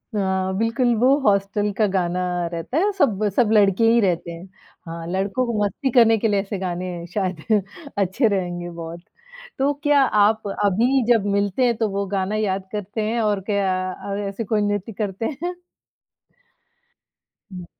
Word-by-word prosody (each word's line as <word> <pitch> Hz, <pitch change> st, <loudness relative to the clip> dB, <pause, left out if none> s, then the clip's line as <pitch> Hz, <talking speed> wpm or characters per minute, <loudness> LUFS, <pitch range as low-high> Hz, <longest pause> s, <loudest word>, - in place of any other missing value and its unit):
हाँ, 190 Hz, -1 st, 0 dB
बिल्कुल 235 Hz, +2 st, +1 dB
वो 265 Hz, +3 st, +4 dB
हॉस्टल 205 Hz, -1 st, +1 dB
का 215 Hz, -, +3 dB
गाना 180 Hz, -2 st, -1 dB, 0.3 s
रहता 175 Hz, -, -3 dB
है, 405 Hz, +4 st, +2 dB
सब, 215 Hz, -, +2 dB
सब 235 Hz, -4 st, +3 dB
लड़के 200 Hz, 0 st, +4 dB
ही 235 Hz, -, +4 dB
रहते 175 Hz, -3 st, 0 dB
हैं। 170 Hz, +2 st, -9 dB, 0.4 s
हाँ, 165 Hz, 0 st, -6 dB
लड़कों 195 Hz, +7 st, -1 dB
को 235 Hz, -, -3 dB
मस्ती 265 Hz, +7 st, -1 dB
करने 225 Hz, -1 st, +6 dB
के 225 Hz, -, 0 dB
लिए 205 Hz, -2 st, +2 dB
ऐसे 200 Hz, 0 st, -5 dB
गाने 180 Hz, -1 st, -3 dB, 0.3 s
शायद 190 Hz, +1 st, 0 dB, 0.3 s
अच्छे 200 Hz, +5 st, +2 dB
रहेंगे 175 Hz, -3 st, -2 dB
बहुत, 170 Hz, 0 st, -8 dB, 0.6 s
तो 280 Hz, +2 st, +2 dB
क्या 290 Hz, -1 st, +4 dB
आप 215 Hz, -3 st, +2 dB, 0.2 s
अभी 240 Hz, +7 st, +2 dB
जब 225 Hz, -4 st, +3 dB
मिलते 200 Hz, +5 st, +1 dB
हैं 235 Hz, -1 st, +2 dB
तो 220 Hz, -2 st, 0 dB
वो 200 Hz, 0 st, -2 dB
गाना 195 Hz, +1 st, -1 dB
याद 195 Hz, -3 st, -1 dB
करते 210 Hz, +1 st, -4 dB
हैं 235 Hz, 0 st, 0 dB
और 205 Hz, -2 st, 0 dB
क्या 200 Hz, -2 st, +1 dB, 0.2 s
अ, 200 Hz, +2 st, -6 dB
ऐसे 200 Hz, +3 st, -4 dB
कोई 215 Hz, +1 st, 0 dB
नृत्य 205 Hz, +1 st, -2 dB
करते 205 Hz, +1 st, -3 dB, 0.2 s
हैं? 355 Hz, +1 st, -1 dB, 2.0 s
हुँ। 180 Hz, -1 st, -7 dB
205 Hz, 165 wpm, -22 LUFS, 190-225 Hz, 2.0 s, करने